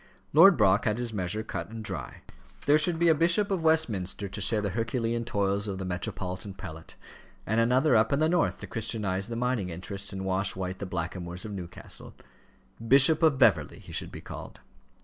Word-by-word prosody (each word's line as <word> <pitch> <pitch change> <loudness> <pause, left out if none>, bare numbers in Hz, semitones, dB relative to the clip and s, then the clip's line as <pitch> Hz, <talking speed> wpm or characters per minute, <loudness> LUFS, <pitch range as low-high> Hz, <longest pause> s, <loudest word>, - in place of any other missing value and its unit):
Lord 195 -3 +8
Brock 100 -3 +3
had 105 0 +1
his 120 -2 -3
measure 100 +2 -2
cut 110 - -5
and 110 0 -7
dry. - - -5 0.4
There 150 +2 +5
should 165 +1 +2
be 170 +1 +2
a 165 - +6
Bishop 170 +6 +2
of 190 -3 0
Westminster 110 - +1
to 100 +2 -5
share 105 +2 +2
the 100 -2 -2
Herculean 115 +2 -2
toils 100 -1 0
of 95 -2 -3
the 95 - -5
metropolitan 90 +1 -4
prelate, 80 -4 -9 0.5
and 110 +3 +1
another 125 +4 +3
up 110 0 +3
in 140 - +2
the 155 - +3
North 175 +1 +1
to - - -5
Christianize 105 -4 -2
the 115 - -5
mining 120 -5 -1
interests 95 +4 -5
and 95 0 -5
wash 95 +1 0
white 95 0 -4
the 100 - -5
blackamoors 90 +1 -5
of 110 - -6
Newcastle: 90 -2 -7 0.7
Bishop 140 +6 +6
of 155 -4 +4
Beverley 80 - +3
he - - -13
should - - -4
be - - -9
called. - - -9
105 Hz, 195 wpm, -28 LUFS, 95-130 Hz, 0.7 s, Lord